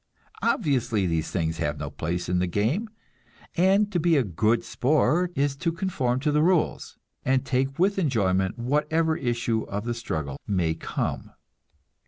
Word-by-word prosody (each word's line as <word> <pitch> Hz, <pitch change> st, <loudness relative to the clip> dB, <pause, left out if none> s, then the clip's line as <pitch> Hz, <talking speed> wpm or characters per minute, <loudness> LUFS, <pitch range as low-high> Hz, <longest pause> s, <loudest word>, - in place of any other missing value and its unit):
Obviously, 130 Hz, -, +1 dB
these 80 Hz, -2 st, -1 dB
things 80 Hz, -2 st, -2 dB
have 75 Hz, -3 st, -1 dB
no 70 Hz, 0 st, -5 dB
place 85 Hz, +2 st, -3 dB
in 90 Hz, 0 st, +1 dB
the 90 Hz, -, +1 dB
game, 120 Hz, -, 0 dB, 0.7 s
and 195 Hz, +4 st, +3 dB
to 180 Hz, -, +1 dB
be 165 Hz, -1 st, +3 dB
a 135 Hz, -, +3 dB
"good 110 Hz, +4 st, +1 dB
sport" 155 Hz, +6 st, +1 dB
is 140 Hz, 0 st, +1 dB
to 165 Hz, +3 st, 0 dB
conform 165 Hz, -9 st, -1 dB
to 150 Hz, +1 st, +1 dB
the 150 Hz, +1 st, +3 dB
rules, 175 Hz, 0 st, +1 dB, 0.3 s
and 130 Hz, 0 st, +1 dB
take 135 Hz, +1 st, 0 dB
with 195 Hz, +3 st, +2 dB
enjoyment 95 Hz, -, +1 dB
whatever 150 Hz, +6 st, +1 dB
issue 120 Hz, -4 st, -1 dB
of 100 Hz, +1 st, -3 dB
the 120 Hz, -, -1 dB
struggle 80 Hz, -, -4 dB
may 90 Hz, -5 st, +1 dB
come. 80 Hz, -, -3 dB
125 Hz, 160 wpm, -26 LUFS, -, 0.7 s, and